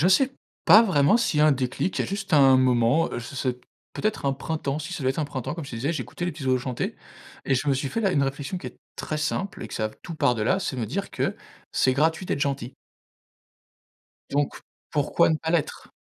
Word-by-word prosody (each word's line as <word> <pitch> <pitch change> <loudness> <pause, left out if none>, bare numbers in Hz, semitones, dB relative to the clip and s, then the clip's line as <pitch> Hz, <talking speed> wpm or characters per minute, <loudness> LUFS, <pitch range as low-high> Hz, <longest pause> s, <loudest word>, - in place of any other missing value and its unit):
je 175 - +4
sais 255 +8 +4 0.3
pas 210 +7 +9
vraiment 180 -1 +4
s'il 230 -10 +1
y - - +4
a 155 - +6
un 150 - +6
déclic. 130 +7 -2
Il - - +2
y - - -2
a - - -5
juste 200 -1 -4
un 135 -2 +7
moment, 125 +4 +3
heu, - - -2
je 120 +5 -8
sais 125 -1 -2 0.3
peut-être 215 -8 -2
un 135 - +3
printemps, 140 +1 -3
si 155 +4 -6
ça 165 - -4
doit 130 - +2
être 135 - -4
un 155 - +1
printemps 135 -4 -4
comme 165 -4 -6
je - - -9
te - - -6
disais, 140 +8 -1
j'écoutais 175 +2 -5
les 175 - 0
petits 145 -2 -8
oiseaux 130 0 +3
chanter 125 0 -3 0.5
et 135 - +2
je 130 - -2
me 135 - +4
suis 135 +1 -2
fait 225 - -2
la 195 -4 +2
une 140 - +2
réflexion 140 +6 -3
qui - - -8
est - - -19 0.2
très 155 - -4
simple 155 +6 -2
et - - -7
que - - -8
ça 110 0 -1
tout 170 - -7
part 125 -5 +2
de 110 - -1
là, 185 - +2
c'est 135 - -3
me 115 - -2
dire 195 - -3
que: - - -1 0.4
«C'est 130 - +3
gratuit 160 +6 +1
d'être - - -1
gentil». 135 -3 -2 1.6
Donc, 145 0 0 0.3
pourquoi 145 -2 +2
ne 160 - +2
pas 160 +1 -4
l'être? 165 -4 -1
145 Hz, 255 wpm, -25 LUFS, 130-170 Hz, 1.6 s, pas